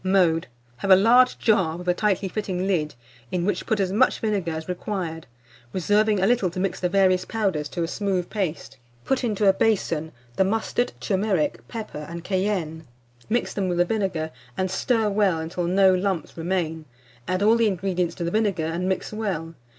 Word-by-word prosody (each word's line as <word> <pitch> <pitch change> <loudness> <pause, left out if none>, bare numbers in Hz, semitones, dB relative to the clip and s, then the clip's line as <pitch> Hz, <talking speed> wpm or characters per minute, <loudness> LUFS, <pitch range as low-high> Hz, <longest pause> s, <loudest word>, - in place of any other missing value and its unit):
Mode. 180 -4 +2 0.3
Have 195 - -4
a 190 - +10
large 240 +6 +5
jar, 190 -7 +2
with 180 0 -9
a 180 - +4
tightly 200 0 0
fitting 190 -2 -3
lid, 160 -8 0 0.4
in 175 -1 -1
which 205 - -1
put 220 - +1
as 190 -2 +1
much 225 +7 +3
vinegar 200 -6 -1
as 160 0 -5
required, 180 -4 -4 0.5
reserving 205 +3 +2
a 190 - +2
little 230 -4 +2
to 180 +2 -6
mix 190 0 -1
the 180 - 0
various 185 -1 +3
powders 190 -9 -1
to 170 - -2
a - - -1
smooth 190 -1 -1
paste. 185 -7 -4 0.3
Put 270 -1 0
into 210 -3 +1
a 195 - +7
basin 170 -7 0 0.3
the - - +5
mustard, 225 +4 0
turmeric, 155 - 0
pepper, 210 -10 -6
and 170 0 -7
cayenne; 185 -5 -2 0.4
mix 240 +2 0
them 195 -2 -1
with 175 0 +2
vinegar, 185 -7 -1 0.3
and 185 -1 -1
stir 225 +3 +1
well 200 -4 +2
until 165 +2 -3
no 190 +2 +4
lumps 185 -3 -1
remain; 165 -2 -2 0.4
add 185 +2 0
all 220 +2 +5
the 230 -1 +3
ingredients 185 -3 -1
to 175 - -4
the 170 - -1
vinegar, 205 -6 +1
and 170 +3 -2
mix 190 +2 -2
well. 185 -7 -3
185 Hz, 185 wpm, -24 LUFS, 170-205 Hz, 0.5 s, a